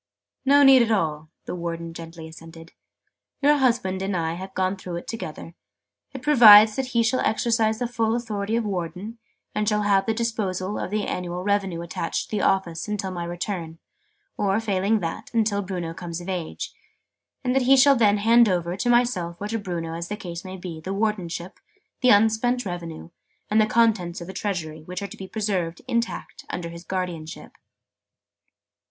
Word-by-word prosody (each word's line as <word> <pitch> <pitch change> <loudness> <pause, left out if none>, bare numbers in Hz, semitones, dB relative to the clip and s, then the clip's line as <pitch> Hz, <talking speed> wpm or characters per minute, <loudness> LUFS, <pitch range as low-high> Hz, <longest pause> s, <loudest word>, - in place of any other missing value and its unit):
"No 285 +1 +6
need 270 -2 +8
at 235 - +2
all," 155 -7 0 0.2
the - - -5
Warden 170 -1 -5
gently 165 -1 -9
assented. 165 +1 -13 0.7
"Your 295 +1 +4
husband 230 -8 +1
and 195 -1 -1
I 165 -1 -1
have 190 +2 -8
gone 185 +1 0
through 185 -2 -7
it 170 - -6
together. 170 -6 -6 0.6
It 265 -1 -9
provides 220 -7 +8
that 265 -1 -2
he 230 - +5
shall 225 +3 +1
exercise 220 -1 +1
the 245 - -2
full 230 -1 0
authority 220 -2 -2
of 230 -1 0
Warden, 190 +4 -4 0.3
and 210 0 0
shall 210 -1 +1
have 200 0 +2
the 225 - +1
disposal 210 -4 -2
of - - -3
the 210 +1 -1
annual 180 0 -4
revenue 195 -4 0
attached 170 - -3
to - - -1
the - - 0
office, 175 -3 0
until 205 -2 -3
my 175 -2 -4
return, 170 -1 -4 0.6
or, 200 +1 +1
failing 205 0 +1
that, 165 -1 -5
until 215 -3 +2
Bruno 180 -4 -4
comes 170 -1 -6
of 175 - -10
age: 180 -4 -4 0.7
and 250 -1 +1
that 270 - +3
he 270 - +8
shall 275 +1 +7
then 210 -4 +4
hand 230 +2 +5
over, 175 -1 -1
to 200 +6 -1
myself 235 -9 +1
or 205 - -4
to 225 0 -1
Bruno 170 -5 -4
as 170 +1 -5
the 210 - -4
case 175 -4 -7
may 190 0 -7
be, 175 -3 -7
the 190 +4 -4
Wardenship, 190 -5 -2 0.4
the 255 - +4
unspent 225 +3 +3
revenue, 170 -3 -6 0.4
and 215 +1 +5
the 215 - +3
contents 215 -7 +2
of 170 - -7
the 190 - -8
Treasury, 175 -6 -4
which 180 +4 -6
are - - -3
to - - -11
be 190 - -8
preserved, 185 -6 -2
intact, 235 -8 -3
under 170 -1 -4
his 170 0 -10
guardianship." 175 -4 -5
195 Hz, 185 wpm, -24 LUFS, 170-220 Hz, 0.7 s, need